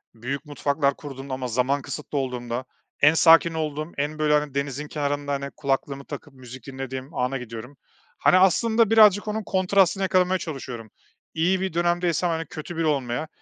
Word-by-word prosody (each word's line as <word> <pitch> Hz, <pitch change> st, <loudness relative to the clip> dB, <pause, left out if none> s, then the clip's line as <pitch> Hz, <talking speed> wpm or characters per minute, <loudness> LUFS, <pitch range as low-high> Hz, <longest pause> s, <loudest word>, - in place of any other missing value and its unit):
büyük 130 Hz, +5 st, -5 dB
mutfaklar 140 Hz, -1 st, 0 dB
kurduğumda 135 Hz, -2 st, -8 dB
ama 130 Hz, -1 st, -3 dB
zaman 130 Hz, +4 st, 0 dB
kısıtlı 150 Hz, +1 st, -6 dB
olduğunda 125 Hz, -2 st, -3 dB, 0.4 s
en 150 Hz, +2 st, +7 dB
sakin 165 Hz, +1 st, +6 dB
olduğum, 155 Hz, 0 st, -3 dB
en 150 Hz, +2 st, -2 dB
böyle, 150 Hz, -1 st, +2 dB
hani, 150 Hz, -2 st, +1 dB
denizin 140 Hz, +1 st, -3 dB
kenarında, 145 Hz, -1 st, -2 dB
hani, 140 Hz, 0 st, -3 dB
kulaklığımı 140 Hz, 0 st, -2 dB
takıp 145 Hz, 0 st, -9 dB
müzik 130 Hz, -1 st, -12 dB
dinlediğim 130 Hz, +1 st, -6 dB
ana 125 Hz, +2 st, -1 dB
gidiyorum. 125 Hz, +2 st, -9 dB, 0.4 s
Hani, 185 Hz, -, +4 dB
aslında 220 Hz, +4 st, +4 dB
birazcık 215 Hz, -2 st, +6 dB
onun 215 Hz, +1 st, -2 dB
kontrastını 195 Hz, 0 st, +2 dB
yakalamaya 185 Hz, 0 st, +2 dB
çalışıyorum. 125 Hz, -, -7 dB, 0.4 s
İyi 180 Hz, +4 st, +1 dB
bir 190 Hz, -3 st, -2 dB
dönemdeysem, 175 Hz, 0 st, +1 dB
hani, 165 Hz, 0 st, -2 dB
kötü 155 Hz, +3 st, -8 dB
biri 165 Hz, -, 0 dB
olmaya. 140 Hz, -1 st, -1 dB
145 Hz, 160 wpm, -24 LUFS, 135-170 Hz, 0.4 s, en